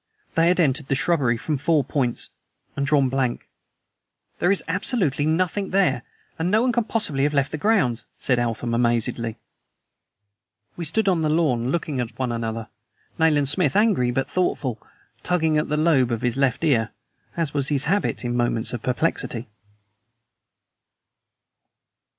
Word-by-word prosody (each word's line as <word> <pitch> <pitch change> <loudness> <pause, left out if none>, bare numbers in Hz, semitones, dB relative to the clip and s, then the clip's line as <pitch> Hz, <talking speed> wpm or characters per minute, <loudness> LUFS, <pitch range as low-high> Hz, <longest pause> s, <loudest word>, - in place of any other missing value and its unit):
They 165 0 +3
had 180 +1 +2
entered 145 -3 +2
the 135 - +1
shrubbery 150 -7 +1
from 150 +4 -2
four 155 0 +2
points 130 -2 -2 0.5
and 140 0 -1
drawn 140 -2 +3
blank. 130 -2 -1 0.9
"There 175 - +2
is 200 - +1
absolutely 165 - 0
nothing 185 +4 0
there, 165 -10 +2 0.4
and 165 +2 0
no 215 +4 +3
one 255 - +2
can 240 -1 0
possibly 210 -12 -1
have 145 +1 +1
left 140 0 +1
the 155 - -4
grounds," 145 - +1
said 125 -2 +1
Eltham 120 0 -2
amazedly. 115 -1 0 1.4
We 170 - -5
stood 200 +7 0
on 180 -4 +2
the 155 - +1
lawn 140 -7 +1
looking 150 -3 -2
at 120 -1 -4
one 130 -2 -1
another, 115 -1 -3 0.5
Nayland 150 -4 +3
Smith, 150 -3 +1
angry 205 - +3
but 135 +2 -1
thoughtful, 135 -10 -1 0.4
tugging 160 -4 +1
at 150 - -3
the 150 - 0
lobe 150 -6 +3
of 115 0 -2
his 120 -2 0
left 135 +1 0
ear, 120 -8 +2 0.5
as 165 -4 0
was 140 -2 +1
his 140 -2 0
habit 195 -5 0
in 120 0 -1
moments 120 -1 0
of 120 - -4
perplexity. 125 -3 -1
145 Hz, 155 wpm, -23 LUFS, 125-165 Hz, 1.4 s, They